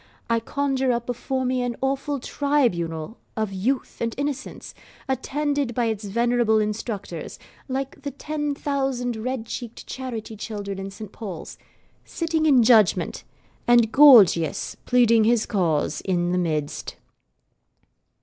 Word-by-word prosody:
I 230 - +3
conjure 270 +1 0
up 235 -1 -1
before 255 +2 -2
me 255 0 0
an 245 -1 -2
awful 275 +1 -1
tribunal 225 - -1 0.2
of 215 -3 -1
youth 245 +8 -1
and 230 -1 -1
innocence, 280 -1 -4 0.3
attended 280 -1 -1
by 240 - +1
its 220 -2 -2
venerable 235 +1 +2
instructors 210 -1 -3 0.3
(like 270 0 -4
the 285 - -4
ten 295 +1 -3
thousand 270 -4 -1
red 235 +1 -3
cheeked 235 0 -7
charity 235 -4 -6
children 200 -2 -5
in 195 0 -5
Saint 200 +1 -9
Paul's), 195 -8 -7 0.5
sitting 325 -2 -1
in 265 -5 +6
judgment, 220 -4 +3 0.4
and 240 -2 +5
Gorgius 225 - +6
pleading 230 -2 +5
his 230 -1 +3
cause 170 -8 0
in 175 -2 0
the 180 - +1
midst. 155 -4 -2
240 Hz, 130 wpm, -24 LUFS, 210-270 Hz, 0.5 s, in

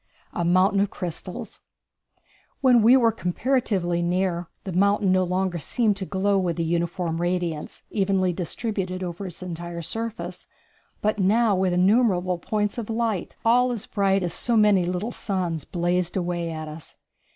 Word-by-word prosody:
A 175 - -1
Mountain 185 +3 +3
of 200 0 +2
Crystals. 180 -1 -6 1.0
When 250 -3 +5
we 240 +4 +7
were 230 -3 +4
comparatively 190 -4 0
near, 175 0 0 0.2
the 190 - -5
mountain 200 +1 +3
no 185 0 +3
longer 180 -1 -1
seemed 215 - +1
to 190 -2 -5
glow 200 +1 +1
with 175 -3 -1
a 170 - 0
uniform 170 0 -1
radiance, 175 -3 -2
evenly 190 -3 +1
distributed 185 +1 -3
over 180 +2 -5
its 180 +1 -8
entire 170 -1 -6
surface, 225 +5 -5 0.6
but 215 0 +1
now 205 0 +3
innumerable 185 -1 +2
points 210 +4 -1
of 225 - -6
light, 225 -4 -1
all 245 +2 +4
as 230 -4 -4
bright 195 -2 +1
as 175 -2 -1
so 235 +4 +1
many 205 -4 +4
little 180 +6 -2
suns, 180 - -2
blazed 175 +1 -1
away 175 -2 -2
at 155 -1 -5
us. 155 +1 -10
185 Hz, 150 wpm, -24 LUFS, 175-210 Hz, 1.0 s, we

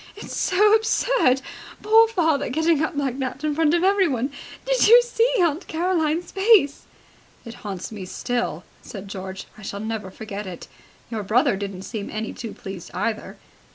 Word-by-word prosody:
"It's 415 - -8
so 415 +3 +3
absurd! 440 - +2 0.4
Poor 445 +2 +6
father 320 - +1
getting 320 +3 +2
up 320 0 -2
like 275 -2 -2
that 260 +2 -4
in 305 -1 0
front 315 +1 +3
of 345 - +1
everyone! 335 - +2 0.3
Did - - +3
you 470 +3 +9
see 480 0 +1
Aunt 340 0 +1
Caroline's 335 -1 0
face?" 390 -8 +3 0.6
"It 230 - -8
haunts 195 -2 -6
me 205 -4 -7
still," 240 +6 -3 0.2
said 200 -2 -9
George. 190 0 -7
"I - - -11
shall 200 0 -6
never 220 -2 -4
forget 205 0 -7
it. 180 -2 -8 0.4
Your 220 -2 -2
brother 235 +5 +2
didn't 195 -1 -6
seem 210 -1 -5
any 215 +1 -4
too 230 -3 -7
pleased, 190 -3 -8
either." 215 +3 -3
275 Hz, 165 wpm, -23 LUFS, -, 0.6 s, you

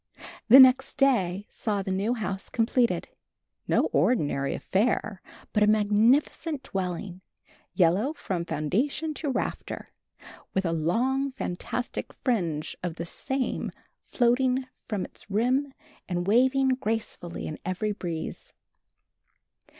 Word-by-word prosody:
The 255 +3 +10
next 260 0 +6
day 205 -9 +2
saw 205 -3 -2
the 190 - -3
new 200 +6 0
house 195 -3 -4
completed 235 +1 +1 0.6
no - - +3
ordinary 145 - +1
affair, 210 -1 0 0.3
but 210 - +2
a 210 - +5
magnificent 225 +8 +2
dwelling, 185 -3 -4 0.5
yellow 190 - +3
from 185 - -3
foundation 210 - -1
to 295 0 -4
rafter, 265 - -3 0.7
with 190 0 +1
a 165 - +1
long, 255 - 0
fantastic 245 +2 -4
fringe 170 - -1
of 175 -2 -3
the 170 - -5
same 265 +9 -2 0.4
floating 255 +1 +2 0.2
from 205 -5 -2
its - - -12
rim 255 +7 +1 0.4
and 175 -1 -1
waving 260 +6 +3
gracefully 225 -8 -2
in 155 - -6
every 185 +4 -1
breeze. 170 -5 -5
215 Hz, 115 wpm, -27 LUFS, 180-255 Hz, 0.7 s, The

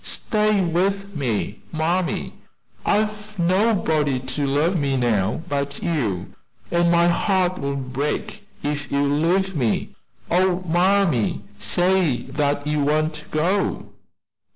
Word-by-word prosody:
Stay 215 -2 +1
with 195 +3 0
me, 115 -7 -2
mammy! 170 +3 -1 0.5
I've 210 0 0
nobody 170 - +2
to 130 +3 -3
love 150 +7 +1
me 140 -4 0
now 110 +1 0
but 140 -2 -3
you, 115 - -1 0.4
and 170 0 +3
my 170 0 +4
heart 185 0 +1
will 140 0 -2
break 135 +2 -3 0.2
if 145 0 -3
you 140 0 +2
leave 170 +7 +1
me. 120 -7 0 0.4
Oh, 185 +1 +2
mammy, 175 - +2 0.2
say 175 - +1
that 145 +1 -1
you 150 0 0
won't 155 +2 0
go!" 180 +6 0
160 Hz, 115 wpm, -22 LUFS, 140-185 Hz, 0.5 s, my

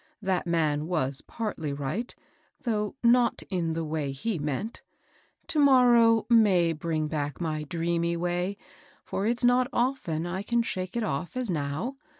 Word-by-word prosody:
That 190 -2 0
man 155 -3 +1
was 140 -6 -1
partly 180 -10 -3
right, 145 - -4 0.5
though 210 -2 -1
not 235 0 +4
in 170 -3 0
the 165 0 -2
way 150 -3 -2
he 170 +8 -3
meant; 150 - -3 0.6
to 310 - -1
morrow 240 -5 +5
may 195 -8 +4
bring 155 -1 -2
back 145 -2 -3
my 155 -3 -2
dreamy 170 +2 -1
way, 175 +3 -1 0.5
for 200 - -2
it's 240 +2 0
not 245 +1 +4
often 235 - -1
I 185 +2 -3
can 235 +3 +1
shake 185 -1 -4
it 235 - 0
off 175 - -3
as 250 -6 -1
now. 155 - -3
175 Hz, 155 wpm, -27 LUFS, 155-230 Hz, 0.6 s, morrow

